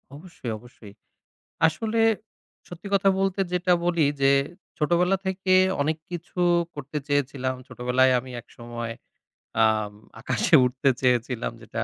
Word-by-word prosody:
অবশ্যই, 155 -6 -8
অবশ্যই। 115 -3 -15 0.7
আসলে 225 +7 -1 0.7
সত্যি 175 +3 -9
কথা 195 0 +3
বলতে 195 0 0
যেটা 180 0 +2
বলি 170 -4 +3 0.2
যে 135 0 +6 0.5
ছোটবেলা 175 +5 +2
থেকে 190 0 +1 0.3
অনেক 155 +2 0
কিছু 175 +1 -6 0.3
করতে 145 +1 -5
চেয়েছিলাম। 135 -2 0
ছোটবেলায় 125 +1 +2
আমি 130 +1 -11
একসময় 120 -1 -7 0.7
আম 110 -1 0 0.3
আকাশে - - +2
উড়তে 130 +2 +1
চেয়েছিলাম 125 -1 0
যেটা 115 0 -4
140 Hz, 115 wpm, -25 LUFS, 125-175 Hz, 0.7 s, যে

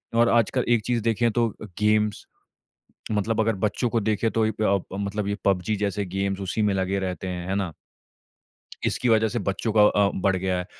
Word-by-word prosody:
और 115 0 +4
आजकल 120 +2 +2
एक 120 -3 +3
चीज़ 120 -2 0
देखें, 115 +1 +2
तो 115 0 +1
अ, 110 - -11
गेम्स 105 0 +1 0.9
मतलब 105 +2 0
अगर 110 0 +2
बच्चों 120 +4 -1
को 115 - +1
देखें, 110 +1 0
तो 115 - -1
वहीं 110 0 +1
पे 110 +1 -3
आप 95 - -1 0.2
मतलब 100 0 -2
ये 100 - -1
पबजी 100 +2 +1
जैसे 100 0 -1
गेम्स 95 +1 -2
उसी 95 +3 -2
में 100 -2 +2
लगे 95 +1 0
रहते 95 0 -4
हैं, 90 0 -5
है 95 - 0
ना? 95 -5 -2 1.1
इसकी 125 - 0
वजह 110 0 +4
से 120 - -2
बच्चों 100 +3 -2
का 105 - +6
अ, 105 -1 +4
बढ़ 95 -1 +2
गया 95 0 -1
है। 90 - -4
105 Hz, 210 wpm, -25 LUFS, 95-110 Hz, 1.1 s, का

